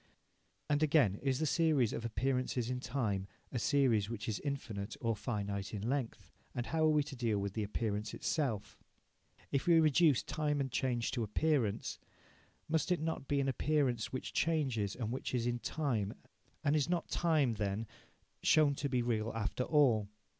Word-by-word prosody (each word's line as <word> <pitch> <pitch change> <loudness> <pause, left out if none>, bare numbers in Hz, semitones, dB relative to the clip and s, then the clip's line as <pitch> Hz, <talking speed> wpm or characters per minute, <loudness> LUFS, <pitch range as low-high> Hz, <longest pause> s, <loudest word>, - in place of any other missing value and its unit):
And, 145 0 +1
again, 140 - +3
is 135 -2 +1
the 155 - 0
series 155 -7 +2
of - - -4
appearances 125 0 -1
in 125 - -2
time 115 -7 -2 0.2
a 125 - -2
series 120 -7 +2
which 110 -3 -5
is 110 -3 -1
infinite 115 -8 -4
or 115 -1 0
finite 100 -3 -3
in 105 +2 -3
length? 120 - -3 0.2
And 120 - -2
how 160 +2 +1
are - - +5
we 150 -1 +3
to 140 -1 -8
deal 115 -4 0
with 100 -1 -2
the 110 - -2
appearance 105 0 -2
itself? 130 -10 -2 0.7
If 140 - 0
we 170 -1 +7
reduce 155 -2 +4
time 150 -2 -1
and 135 -2 -2
change 120 -2 0
to 125 - -2
appearance, 115 0 0 0.7
must 160 +3 0
it 180 - +2
not 160 -3 -3
be 145 - 0
to 140 - +3
an - - -1
appearance 135 -5 0
which 130 - -5
changes 130 -11 0
and 115 -3 -3
which 130 0 -3
is 120 -1 0
in 120 0 0
time, 120 -9 -1 0.5
and 145 - +3
is 150 +1 +1
not 175 -2 0
time, 155 -8 +2
then, 105 0 -2 0.6
shown 150 -2 +5
to 140 - -2
be 125 -2 +1
real 115 -2 0
after 115 +3 -1
all? 120 -9 +3
125 Hz, 180 wpm, -34 LUFS, 110-145 Hz, 0.7 s, we